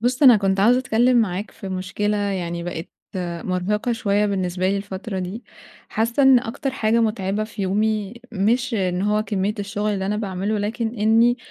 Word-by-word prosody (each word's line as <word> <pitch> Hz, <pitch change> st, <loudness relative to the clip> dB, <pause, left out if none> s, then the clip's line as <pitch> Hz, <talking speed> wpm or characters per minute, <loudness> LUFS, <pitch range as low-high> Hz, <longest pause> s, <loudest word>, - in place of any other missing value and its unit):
بُص 245 Hz, +4 st, 0 dB
أنا 255 Hz, -5 st, +9 dB
كنت 195 Hz, -1 st, +1 dB
عاوزة 240 Hz, +5 st, +5 dB
أتكلِّم 250 Hz, 0 st, +2 dB
معاك 205 Hz, -2 st, 0 dB
في 195 Hz, -, -9 dB
مُشكلة 190 Hz, +3 st, -2 dB
يعني 185 Hz, -4 st, -2 dB
بقت 170 Hz, -1 st, -5 dB, 0.6 s
مُرهقة 200 Hz, +6 st, -1 dB
شوية 210 Hz, -3 st, +1 dB
بالنسبة 185 Hz, -2 st, -1 dB
لي 200 Hz, -, +1 dB
الفترة 195 Hz, 0 st, -5 dB
دي، 185 Hz, +6 st, -5 dB, 0.5 s
حاسِّة 230 Hz, +5 st, 0 dB
إن 265 Hz, -1 st, +7 dB
أكتر 240 Hz, +4 st, -3 dB
حاجة 230 Hz, -3 st, +1 dB
مُتعبة 215 Hz, -2 st, 0 dB
في 215 Hz, -2 st, -6 dB
يومي، 210 Hz, +2 st, 0 dB, 0.2 s
مش 230 Hz, +5 st, +1 dB
إن 185 Hz, -3 st, 0 dB
هو 210 Hz, +1 st, +1 dB
كمية 205 Hz, -1 st, -1 dB
الشُّغل 205 Hz, +1 st, -2 dB
اللي 190 Hz, -1 st, -2 dB
أنا 210 Hz, +2 st, 0 dB
باعمله، 205 Hz, 0 st, -2 dB
لكن 225 Hz, +3 st, -2 dB
إني 230 Hz, +2 st, +4 dB
210 Hz, 170 wpm, -22 LUFS, 190-225 Hz, 0.6 s, أنا